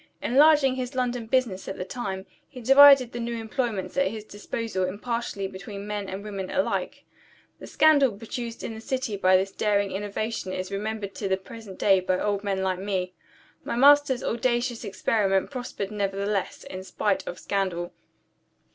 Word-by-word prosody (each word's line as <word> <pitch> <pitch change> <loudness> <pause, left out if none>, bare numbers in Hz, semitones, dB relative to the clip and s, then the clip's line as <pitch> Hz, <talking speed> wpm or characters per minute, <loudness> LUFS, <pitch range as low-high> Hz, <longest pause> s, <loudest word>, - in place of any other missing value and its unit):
Enlarging 285 +1 +5
his 255 0 -4
London 245 -2 -1
business 235 -6 0
at 190 - -5
the 180 - -4
time, 190 -3 -5 0.2
he 260 - -10
divided 270 0 +7
the 240 - -5
new 235 0 -3
employments 225 -3 -3
at 275 - +3
his 220 -1 -5
disposal 205 -1 -4
impartially 205 +1 -3
between 200 +1 -8
men 205 -2 -4
and 195 +1 -6
women 195 -3 -5
alike. 285 0 -1 0.6
The - - -9
scandal 290 -5 +4
produced 230 +1 -6
in 225 - -4
the 220 - -9
city 255 -3 -2
by 185 -1 +4
this 195 +1 -1
daring 200 -1 +1
innovation 205 0 -3
is 185 +1 -4
remembered 205 0 -4
to 200 - -4
the 190 0 +1
present 205 0 -11
day 195 -2 +4
by 185 0 0
old 205 -1 -1
men 195 -2 -1
like 185 -1 -1
me. 185 -2 -2 0.5
My - - -3
master's 280 0 +5
audacious 240 0 -1
experiment 200 -1 0
prospered 245 -6 -5
nevertheless, 200 -1 -2
in 185 0 -7
spite 190 +1 -1
of 175 - -5
scandal. 185 -2 -2
210 Hz, 165 wpm, -26 LUFS, 195-240 Hz, 0.6 s, divided